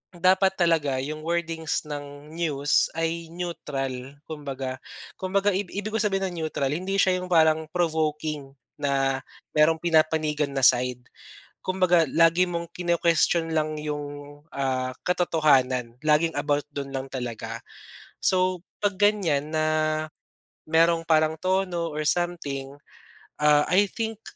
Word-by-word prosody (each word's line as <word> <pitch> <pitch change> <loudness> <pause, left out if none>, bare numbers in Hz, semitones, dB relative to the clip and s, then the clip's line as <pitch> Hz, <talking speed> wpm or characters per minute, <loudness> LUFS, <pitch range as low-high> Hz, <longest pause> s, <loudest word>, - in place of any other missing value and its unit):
dapat 190 +2 +3
talaga 160 -6 +2
yung 155 +2 -5
wordings 165 -1 -1
ng 145 0 -8
news 145 -4 +1
ay 165 0 -2
neutral 135 -6 -5
kumbaga. 135 -4 -5 0.4
Kumbaga 195 +2 +1
ib 195 +1 -1
ibig 205 +2 -4
kong 220 - +1
sabihin 195 -1 -1
ng 175 - -8
neutral, 140 -3 -1
hindi 185 +5 -2
siya 185 -2 +3
yung 180 - -6
parang 160 -1 +4
provoking 155 -4 -1 0.3
na 135 -2 +1 0.4
merong 155 +2 +5
pinapanigan 155 -3 +2
na 135 - -1
side. 125 0 +3 0.6
Kumbaga 185 -2 +3
lagi 165 +2 +4
mong 170 -1 -4
kino-question 170 -1 +2
lang 155 0 0
yung 145 -1 -6 0.2
ah, 130 -2 -1 0.2
katotohanan, 135 -9 +2
laging 155 +2 +3
about 145 0 0
dun 140 -1 -4
lang 135 0 -4
talaga. 115 -3 -5 0.6
So 185 -1 +2 0.2
pag 205 -1 +1
ganyan 180 -8 +2
na 155 0 +2 1.0
merong 165 +1 +3
parang 155 -1 +3
tono 185 -2 0
or 150 0 -3
something, 145 -7 -1 0.7
ah, 150 0 +5
I 195 +2 +4
think 225 -1 -4
155 Hz, 125 wpm, -25 LUFS, 145-175 Hz, 1.0 s, merong